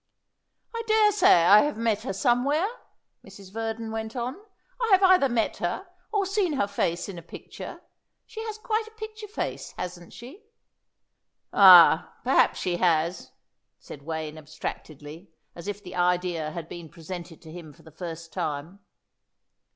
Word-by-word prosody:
"I 460 - -3
daresay 420 -3 +4
I 205 +5 +7
have 295 -5 -1
met 225 -2 0
her 230 - -4
somewhere," 250 - +1 0.6
Mrs. 195 -1 -14
Verdon 225 0 -4
went 220 +1 -5
on. 245 +1 -3 0.5
"I 465 - +1
have 380 +1 +5
either 370 -7 +5
met 235 -2 0
her 175 - -3 0.3
or 410 -2 +1
seen 390 -4 0
her 265 - +1
face 175 -3 -2
in 190 -4 -7
a - - -11
picture. - - -10 0.4
She 445 - -8
has 435 -1 -5
quite 440 -1 -2
a - - -13
picture 435 -1 -8
face, 415 - -5
hasn't 180 -1 -7
she?" 260 - -12 1.1
"Ah, 180 -5 +8
perhaps 260 +3 +3
she 175 -1 -1
has," 170 0 0 0.5
said 145 - -11
Wayne 155 0 -5
abstractedly, 155 +2 -8 0.3
as 170 +2 -9
if 205 0 -5
the 185 -1 -9
idea 175 -3 0
had 165 +1 -7
been 170 -2 -9
presented 170 0 -9
to 160 - -11
him 165 -2 -10
for 165 +3 -20
the 160 - -15
first 165 0 -8
time. 155 +6 -4
195 Hz, 155 wpm, -26 LUFS, 170-280 Hz, 1.1 s, Ah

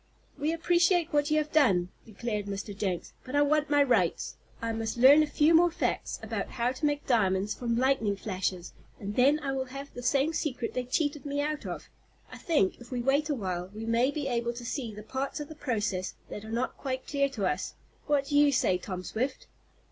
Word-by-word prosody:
"We 300 +2 -1
appreciate 345 0 +2
what 290 0 +2
you 305 - +3
have 305 0 0
done," 195 - +3 0.2
declared 215 -1 -3
Mr. 200 +1 -5
Jenks, 190 -3 -3
"but 255 - -6
I 290 - +5
want 300 +1 +2
my 290 -1 +5
rights. 250 -3 +1 0.2
I 230 0 -2
must 225 +1 -3
learn 270 +5 +8
a 305 - +2
few 300 +2 +3
more 345 +2 +6
facts 330 - -2
about - - -3
how 240 0 0
to 265 +4 -3
make 290 0 -1
diamonds 200 -4 +2
from 235 -2 -1
lightning 245 -5 +2
flashes, 185 -3 -3 0.3
and 205 +1 -5
then 275 +4 +5
I 275 -2 -2
will 265 -1 -1
have 275 +2 -8
the 245 - -7
same 275 +5 +2
secret 260 -6 -2
they 250 0 -2
cheated 290 +2 -1
me 285 0 -2
out 300 +1 -2
of. - - -6 0.4
I - - -9
think 285 - +1
if 240 - -12
we 250 - -3
wait 275 +5 +2
a 295 - +1
while 185 -5 -3
we 220 +1 -5
may 230 +3 +3
be 290 -1 -3
able 235 -2 -1
to 240 0 -8
see 235 -2 -3
the 210 0 -9
parts 265 +6 -3
of 295 - -6
the - - -7
process 210 -9 -2
that 210 - -7
are 220 - -9
not 235 +3 -2
quite 260 -2 -3
clear 280 -1 +1
to 215 -7 -3
us. - - -2 0.3
What 290 -2 +2
do 290 - -2
you 290 -1 +6
say, 185 -8 +2
Tom 185 -1 -5
Swift?" 255 +7 -3
260 Hz, 220 wpm, -29 LUFS, 220-290 Hz, 0.4 s, learn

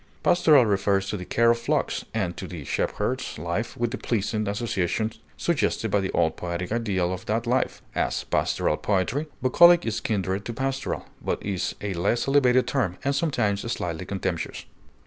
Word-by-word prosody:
Pastoral 160 -7 +5
refers 100 -1 +1
to - - -2
the 90 - -7
care 115 +4 +4
of 120 - 0
flocks, 115 - 0
and - - -2
to - - -6
the - - -7
shepherd's - - -2
life 85 +9 -3
with 120 -1 0
the 130 - -4
pleasing 110 -1 -1
associations 105 0 -1 0.2
suggested - - 0
by 100 - +3
the 95 -1 -2
old 80 -1 +1
poetic 90 +1 -4
ideal 100 -6 0
of 90 - -7
that 115 +3 0
life; 125 +2 0
as, - - -1
pastoral - - 0
poetry. 105 - 0 0.2
Bucolic 170 +6 +6
is 115 -2 -1
kindred 100 -2 -1
to 120 - -4
pastoral, 135 +2 -2 0.2
but - - -1
is 95 -2 -2
a 105 -2 -2
less 95 +9 0
elevated 130 -2 +4
term, 105 -10 -1
and 140 - +1
sometimes 120 -10 +1
slightly 90 -4 -3
contemptuous. 95 -4 -3
105 Hz, 170 wpm, -25 LUFS, 95-125 Hz, 0.2 s, Bucolic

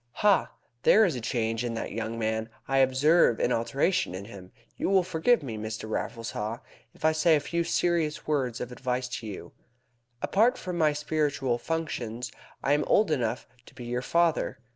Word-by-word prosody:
"Ha! 200 -5 +3 0.3
There 220 +1 +6
is 175 - +1
a 125 - -4
change 115 0 -1
in 120 -1 -2
that 115 - -4
young 115 +1 -4
man. 110 0 -1 0.2
I 135 +1 +2
observe 135 0 +4
an 125 - +1
alteration 135 - 0
in 95 +2 -6
him. 95 -4 -11 0.2
You - - -1
will 190 -2 +4
forgive 185 +6 +2
me, 115 -5 -5
Mr. 110 0 -5
Raffles 115 +1 -3
Haw, 110 +2 -3 0.4
if - - -6
I 160 - +6
say 155 +1 +4
a - - +2
few 170 +3 -1
serious 170 -2 0
words 130 -6 -1
of 125 - -5
advice 125 0 -2
to 110 - -8
you. 100 - -8 0.7
Apart 220 - +3
from 180 -1 -5
my 155 -2 +4
spiritual 145 -5 -1
functions 125 -8 -3 0.3
I 140 - +3
am 150 - +2
old 210 -6 +3
enough 125 -5 -1 0.2
to - - -16
be 125 - -8
your 120 +1 -2
father. 165 -1 +1
130 Hz, 185 wpm, -28 LUFS, 115-160 Hz, 0.7 s, There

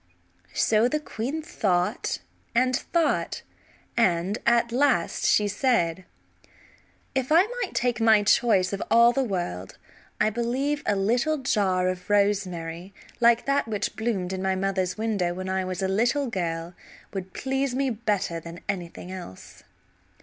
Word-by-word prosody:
So 220 +2 +3
the 305 +4 0
queen 295 +2 -4
thought 200 - 0 0.4
and 255 +1 +3
thought, 335 +4 0 0.5
and 190 -2 +1
at 235 0 +3
last 255 -8 +1
she 210 - +4
said: 190 -6 0 1.1
"If 265 +1 -1
I 335 +3 +7 0.2
might - - -4
take 240 -2 0
my 220 -2 +5
choice 205 -3 +3
of 195 - -3
all 235 +1 +6
the 270 - 0
world 175 - -4 0.4
I 215 - +3
believe 260 +6 -1
a 205 - +2
little 240 +10 +1
jar 195 -8 +1
of 185 +1 -4
rosemary 190 -3 0 0.2
like 235 0 +4
that 275 -3 +1
which 215 -1 -2
bloomed 200 -5 -2
in 190 - -3
my 190 0 0
mother's 190 -1 -1
window 205 -6 -1
when 185 +1 -5
I 190 0 0
was 185 +1 -3
a - - +2
little 240 +9 +1
girl 170 -6 -3 0.4
would 190 -1 -6
please 270 -1 -1
me 270 -1 +1
better 205 -7 -1
than 170 +1 -10
anything 180 -2 -5
else." 180 - -10
205 Hz, 145 wpm, -26 LUFS, 185-240 Hz, 1.1 s, I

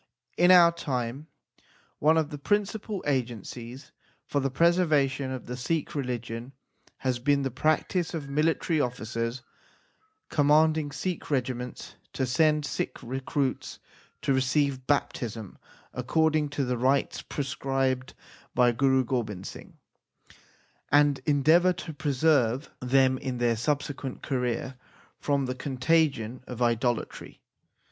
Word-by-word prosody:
In 175 +1 +4
our 175 -2 +8
time 135 -3 -4 0.7
one 155 +2 +4
of 160 -1 0
the 145 - -6
principal 205 +3 -1
agencies 125 -1 -4 0.3
for 145 - -1
the 135 0 0
preservation 145 -3 +2
of 130 -1 -5
the 125 - -5
Sikh 150 +5 -2
religion 120 -2 -4 0.4
has 130 -2 -1
been 140 +2 +2
the 135 - -2
practice 155 +6 0
of 150 -4 -5
military 155 +2 +1
officers 115 0 -3 0.8
commanding 155 0 +3
Sikh 180 +4 -4
regi 130 -3 0
ments 125 0 -8 0.2
to 130 - -1
send 150 +4 +2
Sikh - - -3
recruits 135 +2 -2 0.5
to 140 - +2
receive 130 0 +1
baptism 115 -7 -2 0.3
according 155 +4 +1
to 145 -1 -2
the 125 -1 -2
rites 135 +3 +1
prescribed 135 -2 -2 0.4
by 125 -1 +5
Guru 130 +2 +3
Gobind 105 -7 -3
Singh, - - -10 1.1
and 145 0 +4
endeavour 160 +5 +4
to 175 -2 -7
preserve 140 -3 +1
them 130 0 +3
in 130 -2 -4
their 120 -1 +2
subsequent 140 +1 -3
career 125 0 -2 0.4
from 140 -2 0
the 130 - -2
contagion 130 -2 0
of 125 -2 -7
idolatry. 120 0 -1
135 Hz, 120 wpm, -27 LUFS, 125-150 Hz, 1.1 s, our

